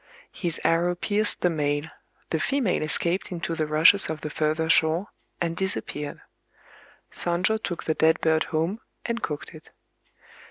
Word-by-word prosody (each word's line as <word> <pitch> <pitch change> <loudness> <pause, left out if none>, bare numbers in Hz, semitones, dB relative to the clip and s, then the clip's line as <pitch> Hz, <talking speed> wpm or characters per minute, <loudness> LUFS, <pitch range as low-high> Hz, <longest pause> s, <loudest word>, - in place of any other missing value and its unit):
His 170 -4 -2
arrow 175 +2 +2
pierced 205 +3 0
the 180 - +3
male: 145 -2 0 0.5
the 160 - +1
female 260 - 0
escaped 170 +5 0
into 170 -1 -3
the 155 -2 -1
rushes 160 +6 +6
of 155 -1 -4
the 150 - -5
further 155 +1 0
shore, 165 +4 +3 0.3
and 170 -1 -1
disappeared. 150 -5 -3 0.9
Sonjō 185 +6 0
took 175 -5 -4
the 160 - 0
dead 160 +1 +3
bird 160 -1 +2
home, 165 +7 -1 0.3
and 235 0 -2
cooked 150 0 -5
it. 155 -1 -14
165 Hz, 150 wpm, -25 LUFS, 155-185 Hz, 0.9 s, rushes